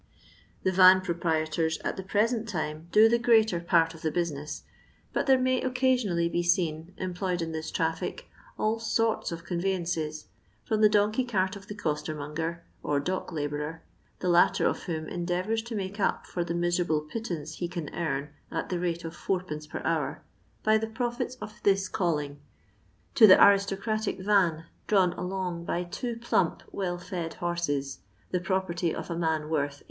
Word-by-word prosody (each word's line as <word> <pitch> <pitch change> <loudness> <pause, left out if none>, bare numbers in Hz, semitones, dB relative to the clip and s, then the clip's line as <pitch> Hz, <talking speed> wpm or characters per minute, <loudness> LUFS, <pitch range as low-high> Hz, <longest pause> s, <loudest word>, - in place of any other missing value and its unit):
The 190 - +2
van 185 0 +7
proprietors 160 -2 0
at - - -1
the - - -5
present 220 +4 0
time 155 -3 -3
do 215 +4 +7
the 235 +1 +3
greater 220 -6 +4
part 170 -1 +3
of 165 - -13
the 160 - 0
business, 150 -3 -3 0.5
but - - 0
there 265 -1 +6
may 255 0 +1
occasionally 250 -9 +1
be 170 +1 0
seen, 175 -1 0
employed 180 0 -2
in 165 -1 -2
this 160 0 -4
traffic, 165 0 -2 0.3
all 220 +1 0
soru 225 0 +1
of 165 0 -6
conveyances, 170 -5 -2 0.4
from 220 -1 0
the 215 - +7
donkey 210 +4 +2
cart 190 -6 0
of 200 0 -11
the 210 - -6
costermonger, 155 -1 -3 0.2
or 145 -1 0
dock 185 +6 -3
labourer, 150 +1 -3 0.4
the 180 - +2
Utter 175 0 +4
of - - +1
whom 160 -2 -3
endeavours 180 +5 -1
to 235 0 -7
make 200 0 -4
up 195 - 0
for 175 - -2
the 170 0 -3
miserable 175 -2 +1
pittance 160 -3 -5
he 175 - -2
can 170 -4 -6
earn 150 -4 -2 0.2
at - - -3
the 180 - -1
rate 170 -1 -2
of 165 - -6
fourpence 165 -5 -3
per - - -6
hour, - - -1 0.4
by 215 0 +4
the 220 - -2
profits 240 +2 -3
of 215 -4 -10
this 195 -1 +3
calling, 150 -7 -1 0.7
to 220 - +8
the 185 - +9
aristocratic 200 +2 +3
van, 185 -5 +2 0.2
drawn 190 -4 +4
along 180 -2 -3
by 175 +1 -1
two 235 +7 -4
plump, 230 -7 0
well 180 -3 -2
fed 175 -2 -5
horses, 145 -6 -2 0.3
the 180 - +1
property 175 -2 -1
of - - -6
a - - -1
man 160 -2 0
worth 145 -2 0
800 - - -16
175 Hz, 170 wpm, -28 LUFS, 160-200 Hz, 0.7 s, the